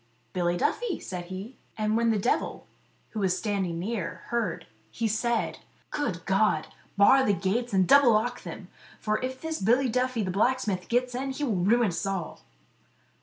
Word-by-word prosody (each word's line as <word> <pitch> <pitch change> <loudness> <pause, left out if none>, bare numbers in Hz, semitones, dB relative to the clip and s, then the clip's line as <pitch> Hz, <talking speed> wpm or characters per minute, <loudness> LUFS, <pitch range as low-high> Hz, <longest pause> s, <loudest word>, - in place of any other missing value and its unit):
"Billy 175 -1 0
Duffy," 425 - 0
said 180 -2 -6
he. 190 +7 -8 0.2
And 215 0 +1
when 230 0 +2
the 220 - +2
devil, 205 +5 -1 0.4
who 220 - -5
was 185 -2 +1
standing 190 -4 -1
near, 190 0 -4
heard, 230 -7 -1 0.2
he 230 - -2
said: 230 +2 0 0.3
"Good 215 - -2
God! 195 +3 +2 0.3
bar 265 +7 +6
the 205 - +3
gates 205 +6 -1
and 190 -2 +3
double 280 -2 +7
lock 240 +3 0
them, - - -8 0.3
for 215 0 -1
if 260 0 -4
this 320 0 -4
Billy 245 +6 +3
Duffy 250 -1 0
the 185 - -2
blacksmith 210 -2 0
gets 245 +1 +1
in 265 +2 -2
he 270 +2 -4
will 250 -6 +1
ruin 210 +5 +3
us 170 - -3
all." 190 -4 -4
220 Hz, 170 wpm, -27 LUFS, 190-245 Hz, 0.4 s, double